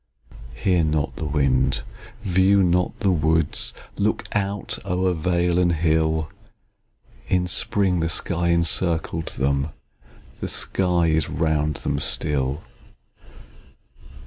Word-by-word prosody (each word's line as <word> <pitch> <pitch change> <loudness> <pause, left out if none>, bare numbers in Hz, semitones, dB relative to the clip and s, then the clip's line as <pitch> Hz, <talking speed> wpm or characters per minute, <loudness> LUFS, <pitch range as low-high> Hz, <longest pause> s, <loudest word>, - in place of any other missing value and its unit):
Hear 90 +6 +1
not 75 -2 -1
the 80 - -4
wind, 70 -3 +1 0.4
view 95 0 +3
not 90 0 0
the 100 - +2
woods; 80 -2 +1 0.3
Look 105 +2 0
out 100 0 -2
o'er 90 -1 0
vale 85 +1 0
and 85 -1 +2
hill 80 -1 0 1.0
In 90 -1 +1
spring, 90 0 +1
the 80 0 -1
sky 85 +1 0
encircled 85 -1 +1
them, 70 +2 -1 0.7
The - - -4
sky 90 -3 +1
is 80 -2 +1
round 75 -2 0
them 70 0 -2
still. 70 -1 0
85 Hz, 110 wpm, -22 LUFS, 75-90 Hz, 1.0 s, view